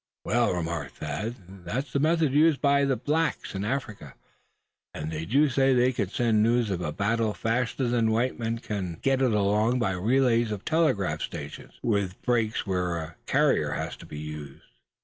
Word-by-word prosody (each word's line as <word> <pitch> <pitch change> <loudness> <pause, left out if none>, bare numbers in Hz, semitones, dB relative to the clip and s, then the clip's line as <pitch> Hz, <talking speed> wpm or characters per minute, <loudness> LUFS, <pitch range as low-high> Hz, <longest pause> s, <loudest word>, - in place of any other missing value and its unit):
"Well," 120 +1 +2
remarked 85 -5 -3
Thad, 80 +11 -4 0.3
"that's 125 - -4
the 140 - +2
method 155 -1 +2
used 155 0 +4
by 140 -1 +3
blacks 150 +4 -1
in 95 0 -3
Africa; 105 - -4 0.8
and 75 +1 -4
they 80 0 -4
do 140 - +3
say 135 0 +3
they 125 +1 +3
can 100 -6 -2
send 110 -1 +2
news 115 -1 +2
of 90 -2 -2
a 75 - -2
battle 110 +4 0
faster 120 +2 -1
than 120 -2 +2
white 120 +4 0
men 115 0 -1
can 100 -7 -4
get 135 -1 +2
it 130 -3 +3
along 105 +4 +2
by 115 -6 +1
relays 115 +4 +2
of 105 -2 -5
telegraph 155 - +1
stations, - - -7
with 100 -4 0
breaks 115 -3 0
where 90 -3 -1
a 80 0 -6
carrier - - +2
has - - -4
to - - -13
be 75 - -8
used." 75 -2 -8
115 Hz, 175 wpm, -27 LUFS, 95-130 Hz, 0.8 s, used